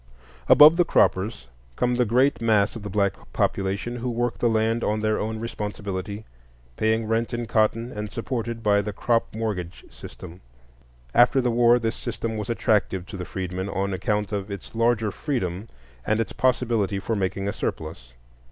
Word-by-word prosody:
Above 150 Hz, +3 st, +9 dB
the 175 Hz, -, +5 dB
croppers 105 Hz, -, +1 dB, 0.3 s
come 125 Hz, 0 st, +1 dB
the 125 Hz, 0 st, +2 dB
great 125 Hz, +4 st, +2 dB
mass 110 Hz, -2 st, +2 dB
of 115 Hz, -, -6 dB
the 105 Hz, -, -6 dB
black 100 Hz, -1 st, +1 dB, 0.2 s
population 100 Hz, +5 st, -1 dB
who 125 Hz, +1 st, -3 dB
work 120 Hz, 0 st, -2 dB
the 120 Hz, -, +2 dB
land 110 Hz, +1 st, +1 dB
on 105 Hz, 0 st, 0 dB
their 110 Hz, 0 st, +1 dB
own 110 Hz, +1 st, -3 dB
responsibility, 105 Hz, -2 st, -5 dB, 0.5 s
paying 110 Hz, -, +1 dB
rent 115 Hz, +2 st, -1 dB
in 120 Hz, 0 st, -3 dB
cotton 115 Hz, +2 st, +1 dB
and 105 Hz, -2 st, -5 dB
supported 115 Hz, -1 st, -4 dB
by 100 Hz, -1 st, +3 dB
the 105 Hz, +1 st, -4 dB
crop 115 Hz, +3 st, +1 dB
mortgage 100 Hz, -6 st, -4 dB
system. 85 Hz, +2 st, -11 dB, 0.7 s
After 125 Hz, +2 st, +5 dB
the 125 Hz, -2 st, +1 dB
war 120 Hz, 0 st, +5 dB
this 115 Hz, -1 st, -2 dB
system 115 Hz, -1 st, -4 dB
was 105 Hz, 0 st, -4 dB
attractive 105 Hz, -5 st, +1 dB
to 100 Hz, -, -9 dB
the 90 Hz, -1 st, -5 dB
freedmen 95 Hz, +1 st, -4 dB
on 100 Hz, 0 st, -2 dB
account 105 Hz, +2 st, -1 dB
of 100 Hz, -1 st, -3 dB
its 100 Hz, -2 st, -8 dB
larger 115 Hz, -2 st, +1 dB
freedom 105 Hz, -, -3 dB, 0.3 s
and 110 Hz, +1 st, 0 dB
its 115 Hz, -, -2 dB
possibility 115 Hz, -6 st, +1 dB
for 110 Hz, +3 st, -2 dB
making 100 Hz, 0 st, -2 dB
a 100 Hz, -, -1 dB
surplus. 65 Hz, -6 st, -5 dB
110 Hz, 170 wpm, -24 LUFS, 100-115 Hz, 0.7 s, Above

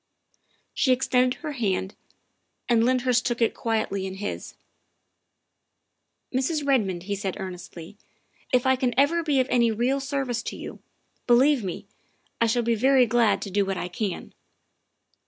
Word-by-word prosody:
She 285 Hz, -4 st, +2 dB
extended 255 Hz, 0 st, +2 dB
her 310 Hz, -2 st, -4 dB
hand, 200 Hz, -7 st, -2 dB, 0.7 s
and 230 Hz, -2 st, +3 dB
Lyndhurst 250 Hz, 0 st, +2 dB
took 240 Hz, -2 st, -1 dB
it 230 Hz, -, +2 dB
quietly 215 Hz, -4 st, -2 dB
in 190 Hz, -, -6 dB
his. 205 Hz, +1 st, -6 dB, 1.0 s
" -, -, -40 dB
Mrs. 285 Hz, +3 st, 0 dB
Redmond," 200 Hz, -11 st, +1 dB
he 200 Hz, +2 st, -3 dB
said 195 Hz, -2 st, -3 dB
earnestly, 180 Hz, 0 st, -8 dB, 0.3 s
" -, -, -40 dB
if 250 Hz, -1 st, +2 dB
I 260 Hz, 0 st, +4 dB
can 250 Hz, -2 st, -1 dB
ever 300 Hz, +5 st, +3 dB
be 295 Hz, -4 st, +1 dB
of 260 Hz, -, +2 dB
any 235 Hz, -2 st, +4 dB
real 240 Hz, +5 st, 0 dB
service 270 Hz, -4 st, -2 dB
to -, -, -6 dB
you, -, -, -8 dB, 0.5 s
believe 255 Hz, +1 st, +4 dB
me, 195 Hz, +2 st, -5 dB, 0.6 s
I 230 Hz, -, +4 dB
shall 235 Hz, +2 st, +1 dB
be 235 Hz, 0 st, +1 dB
very 255 Hz, +3 st, +4 dB
glad 235 Hz, -2 st, +2 dB
to 200 Hz, -, -7 dB
do 200 Hz, +1 st, +2 dB
what 195 Hz, -1 st, -3 dB
I 180 Hz, -, -4 dB
can. 190 Hz, 0 st, -4 dB
240 Hz, 160 wpm, -25 LUFS, 200-260 Hz, 1.0 s, I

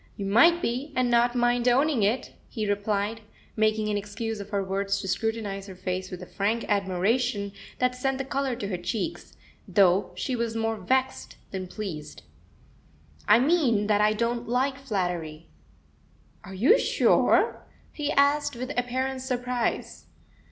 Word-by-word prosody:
"You 200 Hz, -, -4 dB
might 290 Hz, -, +5 dB
be, 255 Hz, +6 st, -2 dB
and 250 Hz, -1 st, +1 dB
not 240 Hz, +1 st, +3 dB
mind 240 Hz, 0 st, +2 dB
owning 265 Hz, +1 st, +3 dB
it," 215 Hz, +6 st, 0 dB, 0.2 s
he 215 Hz, -4 st, -3 dB
replied, 205 Hz, +2 st, -1 dB, 0.3 s
making 215 Hz, 0 st, +1 dB
an 205 Hz, -, 0 dB
excuse 210 Hz, +2 st, -4 dB
of 200 Hz, 0 st, -8 dB
her 200 Hz, -2 st, -1 dB
words 195 Hz, +1 st, -1 dB
to -, -, -5 dB
scrutinise 200 Hz, 0 st, -2 dB
her 190 Hz, -, -9 dB
face 185 Hz, 0 st, -4 dB
with 180 Hz, 0 st, -7 dB
a -, -, -7 dB
frank 210 Hz, +5 st, -1 dB
admiration 200 Hz, +2 st, 0 dB, 0.3 s
that 250 Hz, 0 st, +1 dB
sent 265 Hz, +1 st, -1 dB
the 270 Hz, -, -3 dB
colour 270 Hz, -1 st, -1 dB
to 205 Hz, -, -5 dB
her 180 Hz, -3 st, -3 dB
cheeks, 220 Hz, -, -4 dB, 0.3 s
though 190 Hz, -1 st, +3 dB
she 260 Hz, -, -2 dB
was 230 Hz, -1 st, -2 dB
more 225 Hz, 0 st, 0 dB
vexed 260 Hz, +7 st, -1 dB, 0.2 s
than 190 Hz, -1 st, -4 dB
pleased. 180 Hz, -7 st, -7 dB, 1.0 s
"I 210 Hz, -, +7 dB
mean 255 Hz, -6 st, +2 dB
that 210 Hz, 0 st, +2 dB
I 210 Hz, 0 st, +4 dB
don't 235 Hz, +2 st, -2 dB
like 265 Hz, +2 st, 0 dB
flattery." 175 Hz, -, -3 dB, 0.9 s
"Are 190 Hz, -, -9 dB
you 265 Hz, -, +5 dB
sure?" -, -, +3 dB, 0.3 s
he 295 Hz, -1 st, -2 dB
asked, 285 Hz, 0 st, +2 dB
with 255 Hz, +3 st, -5 dB
apparent 260 Hz, +2 st, -1 dB
surprise. 250 Hz, -2 st, -2 dB
225 Hz, 155 wpm, -26 LUFS, 200-250 Hz, 1.0 s, I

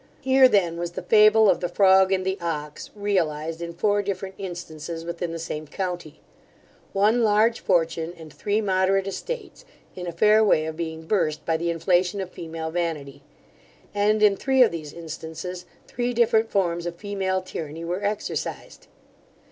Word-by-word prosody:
Here 265 Hz, 0 st, +6 dB
then 180 Hz, -7 st, +2 dB
was 175 Hz, 0 st, -4 dB
the -, -, -6 dB
fable 215 Hz, 0 st, +6 dB
of -, -, +3 dB
the 175 Hz, -, -2 dB
frog 190 Hz, +1 st, +5 dB
and 185 Hz, -1 st, +1 dB
the 190 Hz, +1 st, -1 dB
ox, 150 Hz, -3 st, -4 dB
realized 165 Hz, -6 st, -1 dB
in 170 Hz, 0 st, -4 dB
four 205 Hz, +3 st, +2 dB
different 195 Hz, -1 st, -4 dB
instances 170 Hz, -3 st, -6 dB
within 170 Hz, 0 st, -4 dB
the 165 Hz, -, -4 dB
same 155 Hz, -1 st, -5 dB
county: 175 Hz, -3 st, -5 dB, 0.7 s
one 215 Hz, +5 st, +3 dB
large 220 Hz, +1 st, +3 dB
fortune, 165 Hz, -2 st, 0 dB
and 160 Hz, -2 st, -12 dB
three 210 Hz, +1 st, -1 dB
moderate 190 Hz, -1 st, +2 dB
estates, 485 Hz, -, -6 dB, 0.3 s
in 180 Hz, -1 st, -6 dB
a -, -, -2 dB
fair 215 Hz, +6 st, +4 dB
way 155 Hz, -7 st, +3 dB
of 160 Hz, 0 st, -4 dB
being 160 Hz, -1 st, -5 dB
burst 160 Hz, -5 st, 0 dB
by 165 Hz, -, +1 dB
the 170 Hz, +1 st, -1 dB
inflation 175 Hz, +3 st, +1 dB
of 185 Hz, -2 st, -5 dB
female 160 Hz, -1 st, -6 dB
vanity; 155 Hz, -5 st, -3 dB, 0.7 s
and 210 Hz, +1 st, +2 dB
in 205 Hz, -2 st, +6 dB
three 265 Hz, +3 st, +4 dB
of 240 Hz, -, +2 dB
these 155 Hz, -3 st, -6 dB
instances, 170 Hz, +2 st, -7 dB, 0.2 s
three 245 Hz, 0 st, -2 dB
different 225 Hz, -1 st, +3 dB
forms 175 Hz, -3 st, 0 dB
of 170 Hz, -, -5 dB
female 190 Hz, -1 st, -2 dB
tyranny 165 Hz, -3 st, -7 dB
were 180 Hz, +4 st, -3 dB
exercised. 205 Hz, +1 st, -4 dB
180 Hz, 165 wpm, -24 LUFS, 165-205 Hz, 0.7 s, Here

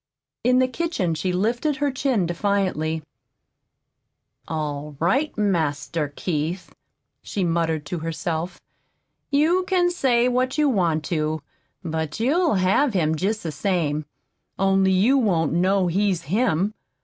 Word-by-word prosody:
In 250 Hz, +1 st, +4 dB
the 255 Hz, 0 st, +4 dB
kitchen 255 Hz, -, -1 dB
she 180 Hz, +3 st, -1 dB
lifted 235 Hz, +11 st, 0 dB
her 290 Hz, 0 st, 0 dB
chin 260 Hz, -7 st, 0 dB
defiantly. 170 Hz, -3 st, -1 dB, 1.4 s
"All 150 Hz, -2 st, -4 dB
right, 260 Hz, -, +1 dB
Master 160 Hz, -6 st, 0 dB
Keith," 170 Hz, +2 st, -3 dB, 0.5 s
she 200 Hz, -, -3 dB
muttered 165 Hz, -3 st, 0 dB
to 170 Hz, +4 st, -4 dB
herself. 165 Hz, +1 st, -3 dB, 0.7 s
"You 315 Hz, +6 st, +3 dB
can 355 Hz, -2 st, +2 dB
say 250 Hz, -8 st, +2 dB
what 255 Hz, +2 st, 0 dB
you 300 Hz, -1 st, +3 dB
want 170 Hz, -, +1 dB
to, 155 Hz, -2 st, -1 dB, 0.4 s
but 160 Hz, 0 st, -3 dB
you'll 300 Hz, -, +2 dB
have 195 Hz, +7 st, +2 dB
him 160 Hz, -3 st, +2 dB
jest 200 Hz, +7 st, -1 dB
the 160 Hz, -, -3 dB
same 155 Hz, -2 st, -1 dB, 0.5 s
only 195 Hz, 0 st, +3 dB
you 220 Hz, +9 st, +4 dB
won't 170 Hz, -, +1 dB
know 185 Hz, +2 st, +2 dB
he's 185 Hz, 0 st, +1 dB
HIM. 200 Hz, -, +1 dB
185 Hz, 125 wpm, -23 LUFS, 160-245 Hz, 1.4 s, In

